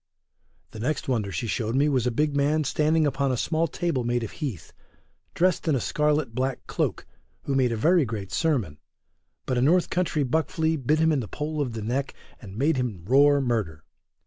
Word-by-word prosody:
The 110 - -9
next 145 +7 -2
wonder 110 -7 -1
she 115 - -3
showed 110 +1 -2
me 140 +2 +3
was 130 -4 +1
a - - +3
big 145 +4 0
man 150 +2 +2
standing 155 +3 +2
upon 140 -1 0
a 125 - -1
small 165 +6 0
table 165 -9 -2
made 120 0 0
of 110 - -5
heath, 125 - -6 0.6
dressed 180 0 +1
in 155 - +3
a - - +1
scarlet 150 -1 0
black 130 +2 -2
cloak, - - -2 0.4
who 140 - -2
made 130 -3 +2
a 115 - -1
very 165 +8 +4
great 105 -6 -5
sermon, 120 - 0 0.7
but 125 -2 0
a - - +1
north 170 +7 +3
country 175 -4 0
buck 155 +5 0
flea 160 -2 0
bit 150 +1 +1
him 160 0 +3
in 150 - +1
the 115 - -4
pole 150 +4 -3
of 125 -5 -2
the 110 -2 -5
neck, 130 +5 -2 0.3
and 100 -3 -10
made 145 +4 +2
him 110 -10 -3
roar 140 +5 +5
murder. 105 - -2
135 Hz, 205 wpm, -25 LUFS, 115-155 Hz, 0.7 s, roar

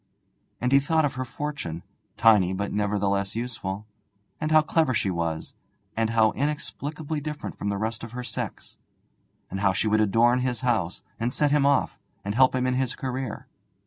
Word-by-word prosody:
And 125 +1 0
he 140 - +7
thought 160 +2 +2
of 140 - -1
her 130 - -3
fortune, 125 - -5 0.3
tiny 105 -5 +5
but 100 +1 -3
nevertheless 100 -1 0
useful, 110 -4 -4 0.5
and 155 - -1
how 155 0 +6
clever 155 -5 +2
she 100 - +1
was, 85 -2 -3 0.4
and 115 0 +1
how 110 -1 +4
inexplicably 150 +1 -3
different 150 0 -5
from 100 - -3
the 100 - -1
rest 110 +2 -3
of 115 0 -8
her 125 0 -4
sex, - - -6 0.7
and 95 - -3
how 100 -1 +3
she 105 - 0
would 110 0 +3
adorn 115 +4 +4
his 125 -1 -1
house, 110 -10 0 0.2
and 115 +2 0
set 145 +2 +2
him 145 -1 +4
off, 140 - +2 0.3
and 100 - -1
help 130 +2 +5
him 130 0 +1
in 130 - +1
his 130 -1 0
career. 130 0 -4
120 Hz, 180 wpm, -26 LUFS, 100-135 Hz, 0.7 s, he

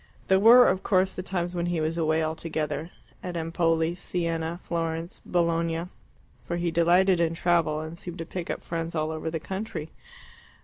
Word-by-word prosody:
There 190 0 +5
were, 240 +4 +8
of 190 - +1
course, 190 -1 +2
the - - -4
times 180 -1 -3
when 175 -1 -1
he 175 -1 0
was 155 +1 -1
away 160 -1 +1
altogether 155 -1 -3 0.3
at 180 -1 -5
Empoli, 165 0 +1
Siena, 170 -1 -2
Florence, 165 0 -3
Bologna 170 0 0 0.5
for 170 - -3
he 175 -1 -1
delighted 175 +2 +4
in 165 -1 +1
travel, 165 -3 +1
and 160 +1 -7
seemed 175 -1 -7
to 165 - -5
pick 175 0 -6
up - - -4
friends 165 0 -4
all 155 0 0
over 160 0 -3
the 160 0 -3
country. 190 -3 -5
170 Hz, 175 wpm, -27 LUFS, 160-175 Hz, 0.5 s, were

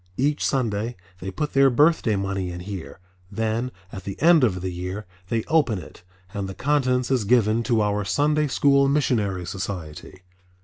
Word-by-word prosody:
Each 145 +3 +1
Sunday 115 -3 -1 0.2
they 95 - -5
put 150 +10 -3
their 135 0 +5
birthday 145 -4 +3
money 95 -1 -2
in 90 0 -7
here, 95 -2 -7 0.3
then 115 +4 -1 0.2
at 95 - -8
the 100 +1 -6
end 165 -2 +5
of 95 -7 +1
the 95 0 -3
year 90 +4 -5 0.2
they 115 -1 0
open 145 -10 +2
it 90 - -11 0.3
and 100 -2 -3
the 95 - -7
contents 130 -2 +1
is 130 -4 +2
given 110 0 +3
to 115 -2 +1
our 105 0 0
Sunday 150 +7 +1
School 140 0 +3
Missionary 105 -10 0
Society. 95 -2 -6
110 Hz, 170 wpm, -24 LUFS, 95-135 Hz, 0.3 s, their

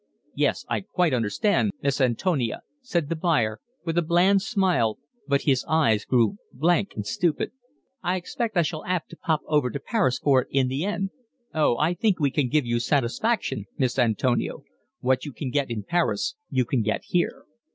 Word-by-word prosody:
"Yes, - - 0
I - - -1
quite 180 -5 0
understand, 115 - +1
Miss 140 0 +1
Antonia," 130 - 0 0.2
said 175 - -1
the 165 - -1
buyer, 150 - +1 0.3
with 165 0 +1
a - - +3
bland 180 +4 +4
smile, 185 - +1 0.3
but 140 -1 +1
his 130 -3 +2
eyes 115 -10 +3
grew 125 - +2
blank 175 +8 +1
and - - -4
stupid. 180 -8 0 0.5
"I 180 - 0
expect 220 +3 -3
I 170 - +5
shall 155 0 -4
'ave 180 -2 0
to - - -10
pop 160 -2 0
over 150 -5 +2
to 140 - -4
Paris 190 - +1
for 135 -3 +3
it - - -10
in 135 -2 +2
the 135 +7 -1
end." 195 -1 -2 0.4
"Oh, 150 -6 +2
I 160 +4 +2
think 200 -2 +1
we 140 -3 +2
can 140 -3 0
give 150 -1 +2
you 120 0 0
satisfaction, 130 - 0
Miss 130 -1 0
Antonia. 120 +1 +1 0.5
What 130 0 +2
you 145 - -5
can 130 -2 -4
get 140 -1 0
in 110 -3 -3
Paris 175 - 0 0.2
you 130 -2 +1
can 120 0 0
get 110 0 -1
here." 175 -1 -1
150 Hz, 185 wpm, -25 LUFS, 125-180 Hz, 0.5 s, I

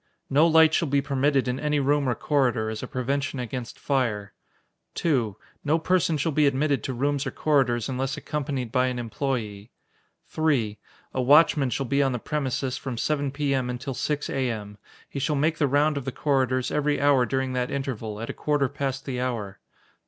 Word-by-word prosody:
No 150 +5 +5
light 160 -1 +6
shall 165 - +2
be 140 0 +2
permitted 140 -1 +1
in 125 +1 -1
any 150 -1 +1
room 140 0 +2
or 120 - 0
corridor, 125 -7 +1
as 110 - -5
a - - -5
prevention 140 +1 -2
against 125 -1 -5
fire. 115 -7 -1 0.6
2. 120 - 0 0.3
No 150 +3 +2
person 170 -1 +1
shall 160 +3 0
be 150 0 +3
admitted 140 +1 +1
to 130 - -2
rooms 140 +3 0
or - - 0
corridors 130 -6 +1
unless 135 +2 -2
accompanied 140 -6 -3
by 130 0 +2
an 125 -1 -2
employee. 115 -3 -3 0.6
3. 125 -10 0 0.3
A 130 - 0
watchman 145 +1 +5
shall 130 +3 -2
be 140 +3 +1
on 135 -2 +2
the - - -1
premises 135 -1 -2
from 130 -4 -5
7 145 +2 0
P.M. 135 -2 -1
until 130 +2 -4
6 145 +3 -2
A.M. 110 -6 -3 0.3
He 140 - -5
shall 150 +3 0
make 155 +3 +1
the 145 - +3
round 145 +2 +2
of 140 - -4
the 135 - -2
corridors 130 -3 0
every 150 0 +1
hour 140 -3 +4
during 130 -1 -1
that 125 -1 -1
interval, 115 -6 -4
at 115 - -5
a - - -9
quarter 145 -2 +1
past 135 0 -4
the 125 -2 -3
hour. 115 -6 -3
135 Hz, 190 wpm, -25 LUFS, 125-145 Hz, 0.6 s, light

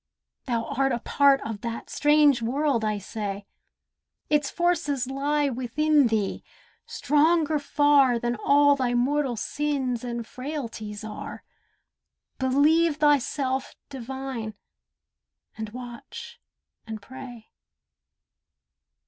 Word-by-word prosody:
Thou 235 -3 -1
art 270 +1 0
a 240 - +1
part 275 +3 +3
of 220 -2 -6
that 230 -1 -6
strange 295 -3 +4
world, 260 0 0
I 215 -1 0
say. 200 0 -5 0.9
Its 295 -2 +2
forces 320 -7 0
lie 285 +2 0
within 275 +3 +2
thee, 215 -3 -1 0.4
stronger 310 +1 +2
far 285 -3 +3
Than 240 +1 -1
all 285 +5 +4
thy 250 -3 0
mortal 265 +1 +1
sins 265 -1 -2
and 235 -1 -4
frailties 230 -6 -6
are, 215 -1 -7 1.0
Believe 295 +5 +3
thyself 280 -2 +1
divine, 265 -4 -6 1.0
and 220 -1 -5
watch, 240 +1 -9 0.5
and 220 -1 -5
pray. 240 0 -11
265 Hz, 100 wpm, -26 LUFS, 235-290 Hz, 1.0 s, strange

